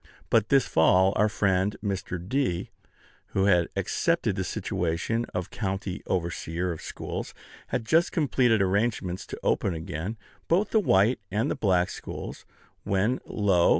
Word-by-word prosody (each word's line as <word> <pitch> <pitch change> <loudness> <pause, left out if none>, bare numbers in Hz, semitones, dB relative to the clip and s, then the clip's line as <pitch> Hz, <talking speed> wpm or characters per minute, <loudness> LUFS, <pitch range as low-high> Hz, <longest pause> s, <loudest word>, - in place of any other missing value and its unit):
But 110 -2 +3
this 135 -2 +4
fall 95 +4 +4
our 105 0 +3
friend 100 -1 +1
Mr. 95 -2 -2
D., 130 -8 -1 0.6
who 95 - +3
had 90 -4 +4
accepted - - 0
the - - -1
situation 90 +8 -1
of 90 -1 -4
county 95 -2 -3
overseer 85 0 -2
of 80 - -6
schools, - - -6 0.3
had 115 - -2
just 165 +9 +3
completed 125 - +3
arrangements 95 -2 0
to - - -7
open 95 - +1
again 80 +6 -4 0.3
both 190 +5 +2
the 220 - +4
white 110 - +3
and 105 +4 0
the - - 0
black 90 -4 +2
schools, - - -7 0.4
when, 105 +6 +1
lo! 95 -5 +3
100 Hz, 145 wpm, -27 LUFS, 90-115 Hz, 0.6 s, this